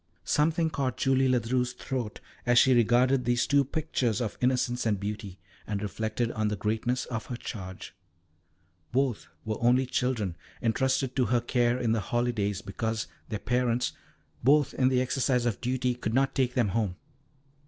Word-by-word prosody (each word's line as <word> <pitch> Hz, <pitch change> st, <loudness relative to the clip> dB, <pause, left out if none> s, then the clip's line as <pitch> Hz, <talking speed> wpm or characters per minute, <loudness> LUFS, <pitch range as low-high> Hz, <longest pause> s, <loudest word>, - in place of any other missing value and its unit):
Something 160 Hz, +2 st, +2 dB
caught 130 Hz, -4 st, -2 dB
Julie 135 Hz, 0 st, +3 dB
Ledru's 125 Hz, 0 st, +1 dB
throat 125 Hz, -3 st, -4 dB, 0.2 s
as 120 Hz, -1 st, +3 dB
she 130 Hz, +1 st, +6 dB
regarded 125 Hz, +3 st, +4 dB
these 120 Hz, 0 st, +2 dB
two 140 Hz, 0 st, +4 dB
pictures 135 Hz, -6 st, -1 dB
of 120 Hz, -4 st, -2 dB
innocence 125 Hz, -1 st, +1 dB
and 105 Hz, -3 st, +1 dB
beauty, 100 Hz, -2 st, -5 dB, 0.3 s
and 105 Hz, -1 st, -2 dB
reflected 110 Hz, +3 st, -2 dB
on 110 Hz, -1 st, -1 dB
the 105 Hz, -, -1 dB
greatness 110 Hz, +5 st, -1 dB
of 115 Hz, -2 st, -5 dB
her 125 Hz, -, -4 dB
charge. 95 Hz, -6 st, -7 dB, 1.0 s
Both 130 Hz, -3 st, 0 dB, 0.2 s
were 110 Hz, -1 st, -3 dB
only 125 Hz, +2 st, +4 dB
children, 120 Hz, -8 st, -1 dB, 0.2 s
entrusted 130 Hz, +2 st, 0 dB
to 130 Hz, -, +3 dB
her 120 Hz, 0 st, +2 dB
care 120 Hz, 0 st, +1 dB
in 120 Hz, -3 st, 0 dB
the 115 Hz, -, +2 dB
holidays, 110 Hz, -2 st, -1 dB
because 110 Hz, +2 st, -2 dB, 0.2 s
their 110 Hz, -, -2 dB
parents, 125 Hz, +2 st, 0 dB, 0.5 s
both 145 Hz, +3 st, +4 dB
in 130 Hz, -, +2 dB
the 130 Hz, -1 st, +2 dB
exercise 125 Hz, -1 st, +1 dB
of 115 Hz, -5 st, -1 dB
duty, 125 Hz, 0 st, 0 dB
could 115 Hz, -2 st, -3 dB
not 135 Hz, 0 st, +2 dB
take 125 Hz, -2 st, 0 dB
them 120 Hz, -5 st, +2 dB
home. 105 Hz, -3 st, -1 dB
120 Hz, 165 wpm, -28 LUFS, 110-130 Hz, 1.0 s, she